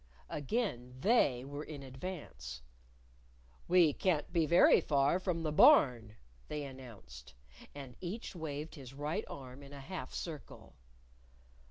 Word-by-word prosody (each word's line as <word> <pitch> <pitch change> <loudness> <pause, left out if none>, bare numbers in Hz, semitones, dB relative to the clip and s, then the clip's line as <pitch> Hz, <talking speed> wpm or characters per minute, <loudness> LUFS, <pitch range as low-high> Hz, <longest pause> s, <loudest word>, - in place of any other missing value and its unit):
Again 145 - -2
They 145 - +3
were 145 +2 -6
in 145 -3 -8
advance. 130 - -7 1.0
"We 175 -4 +5
can't 165 -3 0
be 165 -3 +3
very 170 +3 +6
far 140 +4 +2
from 175 -3 -2
the 155 - 0
Barn," 120 -7 +6 0.3
They 150 -1 -4
announced. 100 - -11 0.4
And 135 -4 -9
each 190 +4 -5
waved 155 -1 -5
his 135 -3 -10
right 150 +9 -2
arm 130 0 -9
in 140 0 -12
a 140 - -8
half 135 -1 -6
circle. 155 -5 -7
145 Hz, 130 wpm, -34 LUFS, 130-170 Hz, 1.0 s, very